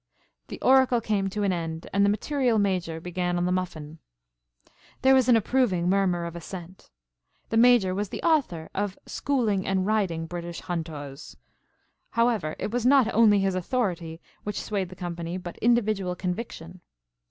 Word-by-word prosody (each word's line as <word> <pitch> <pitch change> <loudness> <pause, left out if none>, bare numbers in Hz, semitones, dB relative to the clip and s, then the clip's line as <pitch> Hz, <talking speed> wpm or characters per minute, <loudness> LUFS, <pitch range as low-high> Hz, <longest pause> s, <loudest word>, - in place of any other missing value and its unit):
The - - -8
oracle 260 -2 +5
came 205 -3 -1
to 205 +2 -3
an 195 -2 +2
end 165 -1 -4
and 200 +1 +3
the 200 - +4
material 245 +2 +1
Major 185 -5 0
began 175 +1 -2
on 175 - 0
the 180 - 0
muffin. 165 -4 -4 1.0
There 265 0 +6
was 260 -2 +4
an 240 - +7
approving 215 -6 +1
murmur 185 -3 +1
of 170 0 -6
assent. 175 +1 -9 0.6
The 225 - 0
Major 230 -6 +5
was 200 +1 -2
the - - -6
author 260 - +1
of 200 -1 -2
"Schooling 225 -9 0
and 190 -1 +1
Riding 190 -6 0
British 170 0 -6
Hunters;" 155 -5 -6 0.7
however, 230 -9 +1
it - - -4
was 245 0 -1
not 260 -2 +4
only 210 -3 +5
his 195 -1 +1
authority 180 -5 -2 0.2
which 210 - -3
swayed 195 -4 -3
the 185 - -11
company, 175 -1 -5
but 175 -2 -8
individual 215 -6 +1
conviction. 180 -2 -5
190 Hz, 160 wpm, -26 LUFS, 175-225 Hz, 1.0 s, an